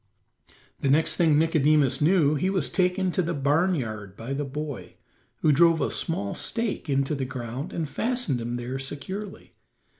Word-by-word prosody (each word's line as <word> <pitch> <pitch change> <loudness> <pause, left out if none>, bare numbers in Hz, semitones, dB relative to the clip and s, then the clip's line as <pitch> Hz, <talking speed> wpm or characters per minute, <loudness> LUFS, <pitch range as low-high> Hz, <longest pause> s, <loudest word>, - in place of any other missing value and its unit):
The 135 - 0
next 155 +4 +3
thing 160 -4 +4
Nicodemus 150 -4 +3
knew 155 -2 +4
he 155 +6 0
was 185 -6 0
taken 185 0 +1
to 185 - +1
the 170 -1 -2
barn 150 +7 +2
yard 110 - -5
by 120 +4 -5
the 145 +2 -2
boy, 145 0 -6 0.5
who 155 - +4
drove 165 +2 +5
a 140 - 0
small 100 -12 -1
stake 225 -8 -3
into 135 +1 +1
the 140 -2 -2
ground 130 +2 -5
and 165 -3 -3
fastened 225 - -1
him 120 +1 -3
there 125 +2 -4
securely. 185 +9 -6
150 Hz, 170 wpm, -26 LUFS, 135-170 Hz, 0.5 s, drove